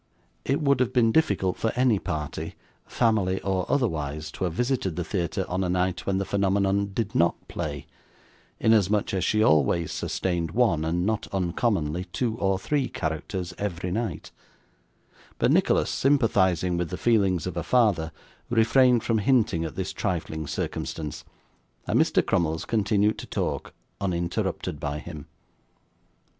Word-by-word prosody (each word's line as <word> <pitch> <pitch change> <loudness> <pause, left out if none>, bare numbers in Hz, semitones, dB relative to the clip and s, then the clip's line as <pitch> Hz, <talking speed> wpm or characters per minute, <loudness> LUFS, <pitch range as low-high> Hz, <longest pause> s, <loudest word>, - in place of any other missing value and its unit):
It 135 - +1
would 140 -3 +3
have 130 -1 +1
been 115 -3 +4
difficult 105 - +1
for 110 - 0
any 125 -5 +3
party, 80 -6 -4 0.3
family, 100 -5 +1
or 95 -2 -1
otherwise, 80 - -1
to 95 - -3
have 85 - -2
visited 120 -5 -1
the 90 - -2
theatre 90 +1 -2
on 90 +2 -1
a 90 - -1
night 90 0 -1
when 95 -1 +1
the 95 - -1
phenomenon 100 0 +1
did 110 +1 -2
NOT 85 0 +3
play, - - -5 0.7
inasmuch 105 -2 +3
as 95 -3 0
she 110 +3 +2
always 80 -1 +3
sustained 85 -3 -2
one, 110 -11 +2
and 85 +3 0
not 110 0 -1
uncommonly 90 -3 0
two 110 +5 -2
or 95 -1 +1
three, 135 +6 -1
characters, 85 +4 -4
every 90 -3 -3
night; 110 -4 -3 1.1
but - - +2
Nicholas, - - +3
sympathising 95 - +2
with 85 -2 -2
the - - -4
feelings 100 -8 +2
of 90 -2 -4
a 85 - -1
father, 100 -8 +2 0.4
refrained 120 +1 +4
from 115 -2 +1
hinting 105 -8 +2
at 80 -4 -5
this - - -3
trifling 80 -3 -3
circumstance, 75 +2 -4 0.6
and - - +2
Mr - - +3
Crummles 80 -4 0
continued 105 -1 +1
to - - -8
talk, - - -3 0.3
uninterrupted 85 -5 -2
by 75 0 -3
him. 75 -2 -9
95 Hz, 150 wpm, -26 LUFS, 85-110 Hz, 1.1 s, been